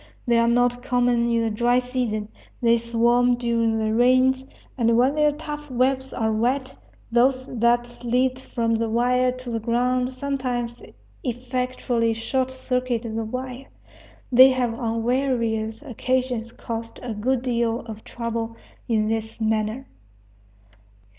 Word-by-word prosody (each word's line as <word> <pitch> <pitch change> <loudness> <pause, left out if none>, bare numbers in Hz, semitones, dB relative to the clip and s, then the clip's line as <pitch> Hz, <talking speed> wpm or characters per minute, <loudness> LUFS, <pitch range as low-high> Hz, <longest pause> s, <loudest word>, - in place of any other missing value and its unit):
They 235 -2 +3
are 230 - +3
not 245 +1 +2
common 245 -2 +2
in 230 -1 +2
the 225 - 0
dry 240 +3 +2
season. 245 -4 -2 0.3
They 235 -1 +4
swarm 235 +1 +2
during 230 -2 0
the 220 0 0
rains; 255 +2 +4 0.3
and, 230 -2 +2
when 255 +3 +4
their 300 0 +3
tough 295 0 -7
webs 265 +1 0
are 220 -2 0
wet, 260 +4 0 0.4
those 255 +2 +3
that 240 +1 +1
lead 255 +2 +1
from 230 -3 -1
the 225 0 0
wire 250 +2 +2
to 255 -1 -7
the 230 - -1
ground 250 +2 0
sometimes 255 -3 -3 0.4
effectually 250 -2 -1
short 255 +3 -1
circuit 250 -2 -2
the 225 -1 -3
wire. 255 +3 -6 0.6
They 255 +2 +9
have 250 -3 0
on 230 -1 -2
various 235 -3 0
occasions 250 -3 -2
caused 230 -1 -6
a 240 -2 -3
good 245 +4 0
deal 235 -2 0
of 220 -2 -9
trouble 230 -1 -4 0.3
in 215 -2 +1
this 220 0 -3
manner. 220 +3 -1
240 Hz, 140 wpm, -24 LUFS, 230-255 Hz, 0.6 s, They